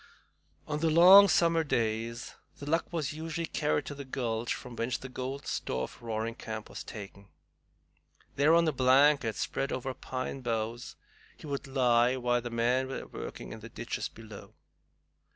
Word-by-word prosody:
On 150 0 -2
the 165 +1 +2
long 185 +5 +9
summer 165 -3 +3
days 115 -3 -2 0.2
The 145 - -9
Luck 165 +3 0
was 155 -5 -2
usually 165 +2 -4
carried 150 -2 -1
to - - -5
the 140 0 -7
gulch 120 -3 -3
from 125 -2 -9
whence 115 +1 -1
the 135 - -8
golden 130 +2 -5
store 65 0 -2
of - - -8
Roaring 115 0 -3
Camp 110 -1 -7
was 100 - -7
taken. 100 -2 -10 1.1
There, 150 +4 +5
on 170 -1 +4
a - - +3
blanket 130 -2 +4
spread 135 - -2
over 130 +1 -3
pine 130 +1 -5
boughs, 115 0 -3 0.4
he - - -12
would 140 0 -4
lie 125 -1 +3
while 120 -1 +1
the 120 - -5
men 120 +3 +1
were 135 - -5
working - - -8
in - - -9
the - - -10
ditches - - -4
below. 110 -2 -12
130 Hz, 170 wpm, -30 LUFS, 115-150 Hz, 1.1 s, long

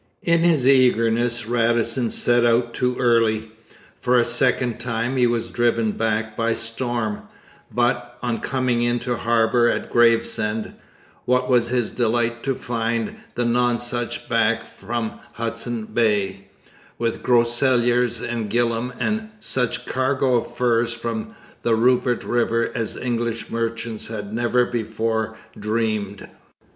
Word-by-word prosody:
In 170 -1 +3
his 165 -6 +3
eagerness 120 -2 +3
Radisson 115 +1 +1
set 120 +1 +2
out 120 0 +2
too 125 0 0
early. 115 -3 +2 0.5
For 125 0 +2
a 120 - +4
second 120 0 +1
time 120 +1 -2
he 125 -2 +4
was 120 -1 -1
driven 115 -2 +1
back 110 0 -1
by 115 0 0
storm, 115 -2 -3 0.4
but, 120 0 0
on 120 -2 -1
coming 130 -3 0
in 120 0 +2
to 125 0 -1
harbour 120 +1 +3
at - - -2
Gravesend, 115 -2 +2 0.5
what 125 0 +2
was 120 -2 +3
his 120 -2 0
delight 120 0 0
to 135 -1 0
find 115 -2 -2 0.2
the 120 - 0
Nonsuch 120 0 0
back - - +2
from 115 +2 -5
Hudson 115 0 -4
Bay 100 -4 0 0.5
with 115 -1 -2
Groseilliers 120 0 +2
and 115 -3 -3
Gillam 120 +2 0
and 215 +1 -1
such 125 - -2
a - - -21
cargo 130 -1 +2
of 115 - -5
furs 120 -1 +2
from 115 -1 -5 0.3
the 115 -1 +2
Rupert 125 +1 +2
river 115 -1 0
as 115 -2 -3
English 115 -2 -2
merchants 115 -1 -3
had 105 -2 -6
never 120 +1 +2
before 110 -1 -2 0.2
dreamed! 105 -2 -2
120 Hz, 130 wpm, -22 LUFS, 115-120 Hz, 0.5 s, a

